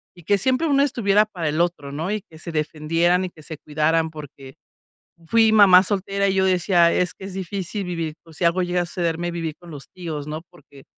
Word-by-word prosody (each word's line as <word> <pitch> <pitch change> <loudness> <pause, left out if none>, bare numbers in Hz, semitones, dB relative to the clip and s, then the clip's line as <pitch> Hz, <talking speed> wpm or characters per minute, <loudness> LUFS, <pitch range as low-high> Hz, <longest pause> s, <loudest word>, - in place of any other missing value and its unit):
y 175 - -16
que 200 +5 +2
siempre 260 - +1
uno 280 -2 +3
estuviera 210 -6 +2
para 175 -7 -4
el 155 +3 0
otro, 170 -5 -2
¿no?, 155 +6 -4
y 215 0 -2
que 160 - -15
se 170 - -7
defendieran 165 +3 0
y - - -5
que 155 -3 -17
se 155 +1 -8
cuidaran, 160 +2 0
porque 140 -3 -11 0.7
fui 225 +4 +4
mamá 195 -4 +7
soltera, 200 0 -1
y 190 - 0
yo 190 0 +2
decía: 180 -2 +3
"Es 180 - +1
que 190 - -12
es 195 - -8
difícil 195 +1 -4
vivir, 165 -3 -4
por 165 - -16
si 170 - -3
algo 170 +2 +2
llega 180 0 0
a - - -4
sucederme, 170 0 -2
vivir 165 -2 -4
con 175 -1 -13
los 145 -3 -9
tíos, 160 -5 -6
¿no?", 155 +1 -4
porque 140 -6 -18
175 Hz, 225 wpm, -22 LUFS, 160-195 Hz, 0.7 s, mamá